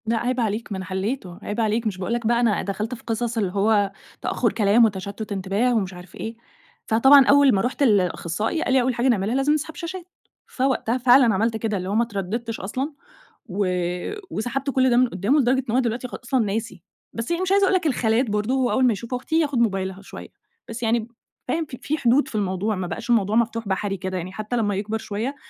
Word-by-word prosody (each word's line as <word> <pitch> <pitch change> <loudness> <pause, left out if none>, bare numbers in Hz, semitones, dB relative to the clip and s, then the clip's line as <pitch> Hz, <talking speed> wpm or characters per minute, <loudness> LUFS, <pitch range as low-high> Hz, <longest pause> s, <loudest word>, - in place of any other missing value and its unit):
لأ 230 +1 +1
عيب 250 +2 -1
عليك 220 0 -2
ما 195 - -2
أنا 190 - -6
حلّيته، 190 -1 -4
عيب 210 +3 -4
عليك 220 +1 0
مش 195 -3 -3
باقول 185 +5 -3
لك 240 -1 -2
بقى 235 0 +3
أنا 230 -4 +2
دخلت 210 +4 -3
في - - -16
قصص 230 +1 -2
اللي 200 -5 0
هو 205 0 +2 0.3
تأخُّر - - 0
كلام 215 +2 +4
وتشتُّت 205 +1 -4
انتباه 200 +5 0
ومش 195 -4 -1
عارف 180 +1 -12
إيه. 225 +1 -6 0.5
فطبعًا 265 +5 +6
أول 280 -1 +6
ما 195 - +2
رُحت 255 +5 -1
لأخصّائي 205 - +1
قال 260 - 0
لي: 265 - +5
"أول 255 +1 +1
حاجة 240 +2 0
نعملها 220 -1 +1
لازم 270 +2 +2
نسحب 310 +1 -3
شاشات." 350 +1 -6 0.4
فوقتها 255 -2 0
فعلًا 245 -2 +5
عملت 220 +3 0
كده، 220 -2 -2
اللي 185 0 -4
هو 200 - -1
ما 230 - +4
اتردّدتش 225 +2 -4
أصلًا، 260 +10 -3 0.5
و 200 -2 -2 0.7
وسحبت 250 +5 -2
كل 260 -1 +3
ده 240 - +3
من 255 0 +5
قُدّامه 205 +11 +1
لدرجة 260 0 +2
إن - - -1
هو - - +4
دلوقتي 245 0 -1
خ - - -18
أصلًا 255 +2 0
ناسي. 205 -3 -4 0.3
بس 230 +5 -4
هي 340 +1 0
مش 375 0 -1
عايزة 400 0 +5
أقول 380 - +2
لك 360 - 0
الخالات 240 -2 +1
برضه 210 +4 0
هو 260 -2 +1
أول 260 - +3
ما 245 - +4
يشوف 235 +4 -7
أختي 285 +6 0
ياخُد 290 -5 0
موبايلها 195 -4 -1
شوية، 200 - -10 0.4
بس 230 +1 -6
يعني 230 +1 +2
ب 230 +1 -9 0.4
فاهم؟ 325 0 -1
ف 270 - -9
في 305 +2 -1
حدود 265 +1 +3
في - - -9
الموضوع، 200 +1 -1
ما 185 -1 -3
بقاش - - -6
الموضوع 215 -3 +2
مفتوح 230 -1 0
بحري 195 +1 -1
كده. 185 0 -4
يعني 180 +1 -5
حتى 215 +4 -4
لمّا 205 -3 0
يكبر 210 +3 -2
شوية، 220 +6 -4
230 Hz, 225 wpm, -23 LUFS, 200-255 Hz, 0.7 s, فطبعًا